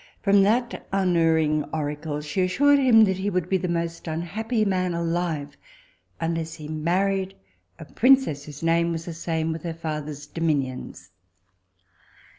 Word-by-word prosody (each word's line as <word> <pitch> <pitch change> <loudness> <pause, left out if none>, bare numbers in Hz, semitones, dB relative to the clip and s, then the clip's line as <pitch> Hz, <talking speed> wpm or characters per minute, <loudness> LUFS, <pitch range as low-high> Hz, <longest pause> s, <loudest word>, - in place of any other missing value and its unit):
From 200 -1 +5
that 235 +5 0
unerring 165 -5 +2
oracle 150 0 -4
she 150 +5 -2
assured 280 +11 +4
him, 240 -5 +6
that 190 -3 +2
he 195 +2 -1
would 180 -4 -1
be 190 - +2
the 180 - -2
most 170 0 -3
unhappy 215 +8 -2
man 185 -3 0
alive 165 -4 -2 0.6
unless 165 -1 -2
he 155 -2 -9
married 190 +5 0 0.4
a - - -10
princess 255 - +3
whose 145 +1 -10
name 170 +1 +2
was 165 0 -4
the 170 - -5
same 160 -1 -2
with 160 0 -5
her 165 -1 -5
father's 150 -3 -5
dominions. 145 -5 -3
170 Hz, 145 wpm, -24 LUFS, 155-190 Hz, 0.6 s, him